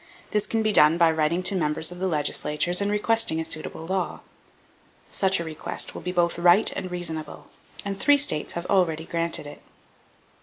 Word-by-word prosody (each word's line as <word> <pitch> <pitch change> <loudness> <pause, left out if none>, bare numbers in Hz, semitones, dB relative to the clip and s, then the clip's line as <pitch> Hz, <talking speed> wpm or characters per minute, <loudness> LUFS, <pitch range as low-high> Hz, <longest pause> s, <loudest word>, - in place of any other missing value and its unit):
This 210 0 0
can 225 -1 -1
be 215 -1 0
done 150 0 +5
by 170 -1 +4
writing 160 +3 0
to 185 +2 +1
members 155 -1 +1
of 180 - -9
the 190 - -1
legislatures 150 +2 0
and 200 - 0
requesting 210 -4 +2
a 160 - -3
suitable 160 0 -5
law. 185 0 -3 0.9
Such 190 -1 +1
a - - -3
request 160 -2 -3
will - - -8
be 180 - -4
both 175 -1 0
right 175 +5 +4
and 185 - -5
reasonable; 165 -3 -4 0.4
and 195 -1 -4
three 290 +1 +4
states 215 - +1
have 170 +1 -5
already 165 -5 +1
granted 170 -2 -3
it. 145 - -11
175 Hz, 185 wpm, -24 LUFS, 160-190 Hz, 0.9 s, done